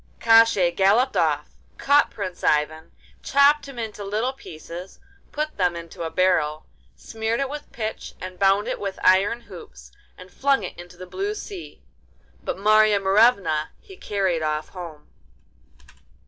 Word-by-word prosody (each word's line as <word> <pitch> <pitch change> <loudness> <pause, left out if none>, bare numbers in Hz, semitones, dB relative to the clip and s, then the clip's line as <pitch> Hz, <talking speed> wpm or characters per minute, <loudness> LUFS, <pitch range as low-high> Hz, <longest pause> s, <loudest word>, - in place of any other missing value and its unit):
Koshchei 225 -6 +5
galloped 215 +7 +3
off, - - +1 0.3
caught 285 +1 +3
Prince 185 -4 -7
Ivan, 155 +1 0 0.3
chopped 285 +1 +3
him 275 -3 -11
into 220 -3 -5
little 215 +6 -2
pieces, 170 -5 -10 0.3
put 305 +1 -4
them 180 -3 +1
into 170 0 -9
a 165 - -2
barrel, 160 -4 +1 0.3
smeared 225 +1 -3
it 275 - 0
with 295 0 -8
pitch 220 -1 -6
and 185 0 -8
bound 195 +1 +3
it - - -3
with 195 -1 -4
iron 195 +6 +3
hoops, 65 - -13 0.3
and 185 0 -13
flung 275 -5 +1
it 185 - -6
into 175 0 -12
the 185 - -9
blue 395 - -4
sea. 395 -4 -9 0.6
But - - -3
Marya 215 +1 +4
Morevna 195 -6 +3
he 390 -3 -14
carried 190 - -1
off 155 0 -2
home. 165 -5 -10
200 Hz, 150 wpm, -23 LUFS, 175-235 Hz, 0.6 s, Koshchei